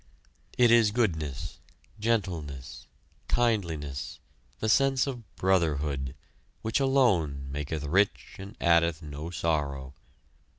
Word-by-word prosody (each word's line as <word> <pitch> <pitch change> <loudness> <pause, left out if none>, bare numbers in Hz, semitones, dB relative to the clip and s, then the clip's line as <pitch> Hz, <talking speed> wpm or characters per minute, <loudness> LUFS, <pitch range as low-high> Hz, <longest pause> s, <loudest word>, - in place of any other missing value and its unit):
It 120 -2 +6
is 115 -2 +6
goodness, 80 - -2 0.4
gentleness, 90 - -2 0.4
kindliness, 85 - -1 0.4
the 110 - -2
sense 135 +3 +4
of 120 -9 -7
brotherhood, 75 -7 0 0.5
which 110 +4 +1
alone 105 - +2
maketh 75 +2 -3
rich 95 +8 +1
and 100 +4 -9
addeth 85 -1 +3
no 75 +2 -6
sorrow. 70 -6 -2
85 Hz, 95 wpm, -28 LUFS, 75-110 Hz, 0.5 s, It